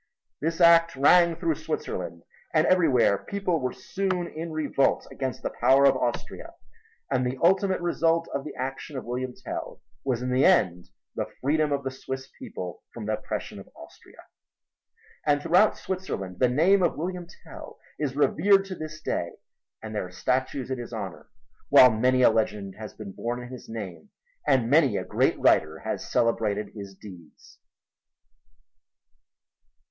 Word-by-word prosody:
This 165 +3 -2
act 170 -1 +6
rang 170 +5 +5
through 165 -1 0
Switzerland, - - -5 0.3
and - - +4
everywhere 130 - +3
people 195 -4 -2
were 130 -2 -2
soon 185 +2 -2
in 165 0 -6
revolt 150 -3 +1
against 130 -3 -4
the - - -2
power 135 +3 +5
of 135 -1 +5
Austria. 125 -2 -4 0.6
And 130 -2 +2
the 125 +1 -2
ultimate 190 +1 +3
result 165 -1 +1
of 140 - -2
the 155 - -8
action 135 +2 -5
of - - -6
William 125 +1 -4
Tell - - -7 0.2
was 125 -3 -1
in 125 - -2
the 130 +2 +3
end 90 - +3 0.2
the - - -3
freedom 150 +2 +1
of 140 -1 -1
the 135 - -3
Swiss 130 0 -7
people 90 -2 -7
from 115 -3 -8
the 110 - -1
oppression - - -5
of - - -13
Austria. - - -15 1.1
And 145 -1 +2
throughout 175 +7 +3
Switzerland 100 - -5
the 125 - +4
name 175 +10 +4
of 175 - +1
William 175 +2 -4 0.2
Tell - - -11 0.2
is 140 -3 -2
revered 195 +7 +3
to 190 -1 -6
this 155 -1 -7
day 85 - -2 0.5
and 110 0 -6
there 105 -3 -3
are - - -15
statues 130 +5 -2
in 130 - -2
his 120 - -7
honor, 100 -6 -7 0.4
while 130 -3 +8
many 125 +3 +2
a - - +7
legend 105 -3 -1
has 110 -1 -9
been 105 -3 -8
born 120 +5 -4
in 125 0 -9
his 130 -1 -10
name 110 - -7 0.4
and 125 -3 +3
many 135 -5 +4
a - - -3
great - - +1
writer 80 0 +3
has - - -4
celebrated 110 -3 +1
his 100 -2 -9
deeds. 90 -7 -14
130 Hz, 165 wpm, -26 LUFS, 115-165 Hz, 1.1 s, while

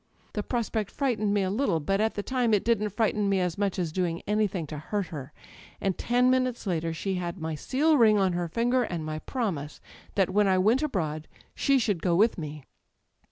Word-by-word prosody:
The 210 - -1
prospect 220 -2 -2
frightened 235 -7 0
me 205 -1 +2
a 185 - -1
little, 200 -7 +1
but 195 +7 0
at 220 +1 0
the 205 - -3
time 245 -3 +2
it 200 - -1
didn't 225 -3 +2
frighten 210 0 0
me 195 -1 +2
as 180 -2 -1
much 200 -1 -1
as 175 -4 -1
doing 170 -1 -2
anything 205 -5 0
to 150 0 -7
hurt 200 +6 -2
her; 145 -4 -7 0.5
and 195 -2 0
ten 250 +1 +2
minutes 255 -2 0
later 165 -3 -1
she 190 +4 -3
had 175 +2 -4
my 160 0 -3
seal 285 - +2
ring 215 -2 +6
on 190 -2 +2
her 175 0 -1
finger, 240 +8 +1
and 175 -9 -3
my 155 0 -4
promise 165 - -3 0.4
that 190 -2 +2
when 205 +1 +3
I 190 -1 +3
iiirent 220 +8 +3
abroad 160 - -2 0.3
she 275 -1 +2
should 205 -9 0
go 175 -2 +2
with 210 +2 +3
me. 150 -2 -7
200 Hz, 210 wpm, -27 LUFS, 170-230 Hz, 0.5 s, ring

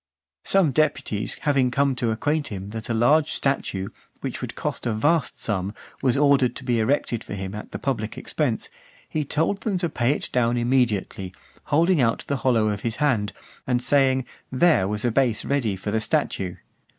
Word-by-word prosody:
Some 190 -7 +3
deputies 140 -7 0
having 135 -4 +2
come 140 +2 +2
to 120 -1 0
acquaint 145 +6 0
him 100 -4 -6
that 110 +1 -7
a - - +1
large 145 +7 +4
statue, 100 -8 -1 0.3
which - - -4
would - - -5
cost - - -3
a 115 - +1
vast 150 +7 +1
sum, 100 -1 -2 0.3
was 130 -2 +2
ordered 140 -4 +4
to - - -7
be 120 -2 +1
erected 115 -1 0
for - - -6
him 95 0 -5
at 105 - -8
the - - -4
public 110 -6 -3
expense, - - -2 0.4
he 155 - -1
told 165 +8 0
them 210 -4 0
to 175 -2 -1
pay 120 -4 0
it - - -3
down 120 -1 +2
immediately, 120 -6 0 0.3
(461) 145 - +1
holding 170 -1 +4
out 115 -2 +1
the 140 - -1
hollow 115 -5 +2
of 105 -1 -2
his 115 -1 -2
hand, 120 -9 +1 0.4
and 125 -1 +2
saying, 130 -2 +3 0.3
"there 130 - +4
was 105 +2 -1
a 120 - +2
base 125 -2 +1
ready 125 -8 0
for 95 +2 -4
the 110 +1 +1
statue." 95 -4 0
125 Hz, 190 wpm, -24 LUFS, 110-140 Hz, 0.4 s, large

